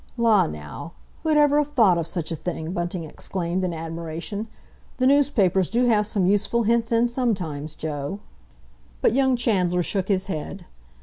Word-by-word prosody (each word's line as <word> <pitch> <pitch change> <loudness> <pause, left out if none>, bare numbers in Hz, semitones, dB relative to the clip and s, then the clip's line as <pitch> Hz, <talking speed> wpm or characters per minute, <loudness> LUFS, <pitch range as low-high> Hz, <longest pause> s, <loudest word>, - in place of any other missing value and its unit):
"La, 230 -3 +4
now! 75 - -8 0.3
Who'd 315 -2 +2
ever 295 0 +5
have 295 0 -2
thought 195 -10 +4
of 165 - -3
such 170 -2 -4
a - - -1
thing?" 160 0 -4
Bunting 175 -1 -3
exclaimed, 175 +3 -3
in 180 - 0
admiration. 165 +5 -5 0.5
"The 255 - +1
newspapers 250 - +3
do 240 +2 +2
have 210 -3 +3
some 200 -4 0
useful 205 +4 +2
hints 230 +1 +1
in 230 +1 +3
sometimes, 180 - -2
Joe." 150 +3 -4 0.9
But - - +4
young 265 0 +3
Chandler 180 -7 +1
shook 195 +1 -2
his 190 -2 +1
head. 180 +1 -5
195 Hz, 165 wpm, -24 LUFS, 170-235 Hz, 0.9 s, ever